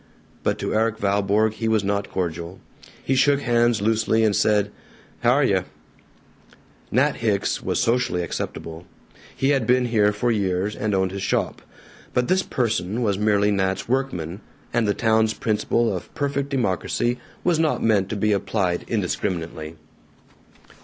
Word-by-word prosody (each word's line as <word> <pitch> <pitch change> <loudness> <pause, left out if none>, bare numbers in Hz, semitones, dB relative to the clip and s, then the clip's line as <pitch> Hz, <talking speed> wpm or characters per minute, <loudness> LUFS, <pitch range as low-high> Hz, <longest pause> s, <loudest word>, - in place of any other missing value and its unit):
But - - 0
to - - -3
Erik 110 0 +1
Valborg 105 +1 +1
he 115 +1 -3
was 110 -2 +2
not 100 0 -1
cordial. 85 0 -4 0.4
He 135 - 0
shook 140 +1 +3
hands 120 -4 +2
loosely, 110 0 +2
and 105 -2 +3
said, 105 -1 +2 0.5
"H' - - -5
are - - +5
yuh." - - +2 1.3
Nat 140 +5 +2
Hicks 105 -4 0
was - - -1
socially 115 -7 +1
acceptable; 85 0 -6 0.5
he 135 - +1
had 135 -6 +2
been 125 0 +3
here 105 -3 +3
for 110 +4 0
years, 100 -1 0
and 105 -1 -1
owned 95 -1 +1
his 100 0 -5
shop; - - -1 0.5
but 125 0 +1
this 185 +1 +3
person 115 - -1
was 100 -3 0
merely 105 -1 +3
Nat's 95 -1 -1
workman, 105 -9 -2 0.3
and 115 -2 +2
the 100 - +1
town's 110 -1 +2
principle 115 +1 0
of - - -7
perfect 140 -2 -1
democracy 120 0 0 0.2
was 170 -3 +2
not 160 -2 +1
meant 100 -4 +2
to 110 - -3
be 105 +1 +1
applied 100 -3 0
indiscriminately. 85 -6 -3
110 Hz, 155 wpm, -23 LUFS, 100-120 Hz, 1.3 s, are